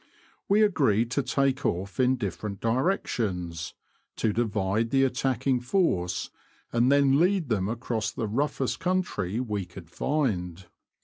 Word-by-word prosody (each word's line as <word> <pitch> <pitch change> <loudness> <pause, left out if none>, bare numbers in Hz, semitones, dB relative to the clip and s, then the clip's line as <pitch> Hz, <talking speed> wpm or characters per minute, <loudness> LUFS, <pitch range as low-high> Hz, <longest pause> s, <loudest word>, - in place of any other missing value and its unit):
We 210 +2 +5
agreed 125 - +2
to 140 - +1
take 135 0 0
off 95 +6 -2
in 130 0 +4
different 100 -3 -4
directions, 105 - -1 0.4
to 110 -2 0
divide 110 -1 0
the 135 +2 +3
attacking 130 0 +1
force, 120 - 0 0.4
and 120 +3 +3
then 140 0 +4
lead 180 -3 +2
them 100 -3 0
across 115 -2 -2
the 110 - -4
roughest 135 +3 -1
country 175 - -1
we 105 -6 -2
could 90 -2 -12
find. 95 - -1
120 Hz, 130 wpm, -27 LUFS, 100-135 Hz, 0.4 s, We